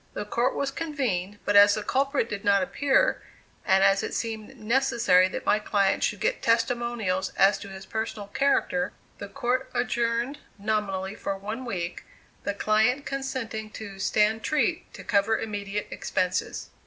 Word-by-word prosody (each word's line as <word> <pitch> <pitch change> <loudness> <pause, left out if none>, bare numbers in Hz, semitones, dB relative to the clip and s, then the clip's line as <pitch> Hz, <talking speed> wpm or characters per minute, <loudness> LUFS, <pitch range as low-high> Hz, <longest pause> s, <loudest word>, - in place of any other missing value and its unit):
The 205 - -3
court 240 +5 0
was 275 -1 -1
convened, 245 - -2
but 205 - +1
as 205 0 +8
the 215 - -3
culprit 275 0 +1
did 205 -3 -5
not 200 -1 +4
appear, 285 - +2 0.4
and 190 +1 +4
as 195 0 +4
it - - -4
seemed 220 -2 -4
necessary 225 -6 +3
that 185 - -6
my 210 - +3
client 200 -2 +1
should - - 0
get - - 0
testimonials 230 -5 0
as 195 +1 +5
to 200 - -9
his 190 0 -9
personal 220 -2 -4
character; 270 +2 +1 0.3
the 200 - -6
court 250 +6 -1
adjourned 240 +3 0 0.2
nominally 200 -2 -1
for 195 -1 -4
one 215 +6 -5
week, 175 -6 -4 0.4
the 200 - -1
client 220 +7 +2
consenting 260 -5 -4
to 200 -3 -8
"stand 215 +3 +2
treat" 305 - 0
to - - -9
cover 210 +2 +2
immediate 205 -1 -4
expenses. 185 +1 -2
215 Hz, 155 wpm, -26 LUFS, 200-245 Hz, 0.4 s, as